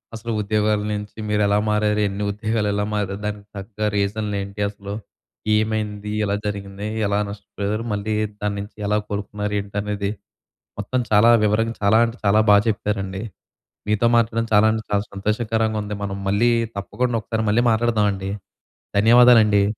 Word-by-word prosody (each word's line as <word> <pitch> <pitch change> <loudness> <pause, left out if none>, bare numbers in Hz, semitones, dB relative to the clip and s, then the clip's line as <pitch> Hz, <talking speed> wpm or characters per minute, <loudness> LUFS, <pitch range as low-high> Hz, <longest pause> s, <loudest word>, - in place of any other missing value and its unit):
అసలు 115 +1 -5
ఉద్యోగాల 105 0 +1
నుంచి 105 0 -6
మీరు 105 0 +1
ఎలా 100 - +3
మారారు, 105 0 +1
ఎన్ని 100 +1 -4
ఉద్యోగాలు 110 +1 -1
ఎలా 105 0 0
మారారు, 100 -2 -1
దానికి 105 -1 -5
తగ్గ 100 +2 -9 0.2
రీజన్లు 105 +1 -1
ఏంటి, 100 +1 -8
అసలు 100 0 -8 0.6
ఏమైంది, 105 -1 -1
ఎలా 100 0 0
జరిగింది, 100 0 -4 0.2
ఎలా 100 +1 +1
నష్టపోయారు, 105 +1 -4
మళ్ళీ 105 +1 -2 0.3
దాన్నించి 100 0 -3
ఎలా 105 +1 +2
కోలుకున్నారు 105 0 -4
ఏంటనేది, 100 0 -3 0.7
మొత్తం 115 +5 -1
చాలా 110 +3 +6
వివరంగా, 115 +2 +1
చాలా 100 +2 +5
అంటే, 115 0 -3
చాలా 100 +2 +4
బాగా 100 0 +7
చెప్పారండి. 100 -2 -2 0.7
మీతో 105 +2 +2
మాట్లాడడం 115 0 +1
చాలా 105 +1 +6
అంటే, 110 - -2
చాలా 100 0 +1
సంతోషకరంగా 110 +2 -1
ఉంది. 105 0 -5
మనం 100 -1 -3
మళ్ళీ 105 +5 +3 0.3
తప్పకుండా 120 +4 -1
ఒకసారి 110 0 -2
మళ్ళీ 120 +3 +3
మాట్లాడదామండి. 105 -4 +1 0.7
ధన్యవాదాలండి. 115 -2 +6
105 Hz, 145 wpm, -22 LUFS, 100-110 Hz, 0.7 s, బాగా